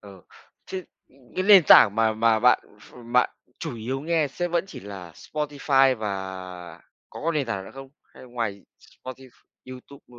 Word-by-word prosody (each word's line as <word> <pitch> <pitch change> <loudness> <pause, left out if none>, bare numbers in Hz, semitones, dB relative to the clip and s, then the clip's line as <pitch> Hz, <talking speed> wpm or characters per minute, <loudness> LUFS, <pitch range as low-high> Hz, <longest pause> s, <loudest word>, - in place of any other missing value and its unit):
Ừ. 100 -3 -14 0.5
Thế, 190 - -5 0.3
ừ, - - -28 0.2
cái 185 - +1
nền 195 -3 +8
tảng 100 - +8
mà 110 0 +2
mà 110 0 +2
bạn 125 0 +5 0.2
ph - - -18 0.2
bạn 125 - +3 0.3
chủ - - -5
yếu 125 +5 -4
nghe 160 -1 0
sẽ 175 +6 -3
vẫn 170 +1 0
chỉ - - -10
là 95 -3 -9
Spotify 140 - +1
và 95 -4 -6 0.3
có - - -10
cái 165 +2 0
nền 145 -5 -1
tảng 100 -4 -4
nữa - - -11
không? 135 0 -10 0.2
Hay - - -16
ngoài 115 -5 -4 0.2
Spotif 130 0 -12 0.4
YouTube, 130 +2 -12
ơ 120 -1 -16
125 Hz, 185 wpm, -24 LUFS, 100-140 Hz, 0.5 s, nền